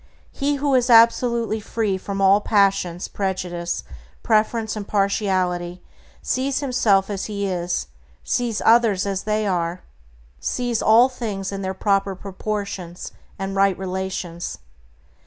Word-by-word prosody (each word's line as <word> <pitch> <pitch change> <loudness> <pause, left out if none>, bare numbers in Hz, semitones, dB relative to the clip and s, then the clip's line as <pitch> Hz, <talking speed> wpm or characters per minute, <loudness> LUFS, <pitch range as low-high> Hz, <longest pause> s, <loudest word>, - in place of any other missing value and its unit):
He 285 +1 -1
who 280 0 0
is 250 -1 +3
absolutely 230 -1 +4
free 215 -1 -1
from 195 +1 -4
all 195 +1 +5
passion, 195 -5 +2
prejudice, 180 -3 -3 0.4
preference, 220 0 +1
and 205 -2 -6
partiality, 185 -3 0 0.4
sees 265 +1 0
himself 225 -8 +2
as 195 -2 -3
he 200 -2 -3
is; 175 -2 -2 0.4
sees 235 -4 -1
others 225 -5 +4
as 195 -1 -3
they 215 0 0
are; 175 -2 -1 0.6
sees 240 - -1
all 230 +3 +6
things 210 -7 -4
in 195 0 -4
their 190 0 -3
proper 195 -1 +1
proportions 195 -2 -5 0.3
and 195 0 -4
right 195 -1 +3
relations. 185 -2 -4
200 Hz, 125 wpm, -22 LUFS, 190-225 Hz, 0.6 s, all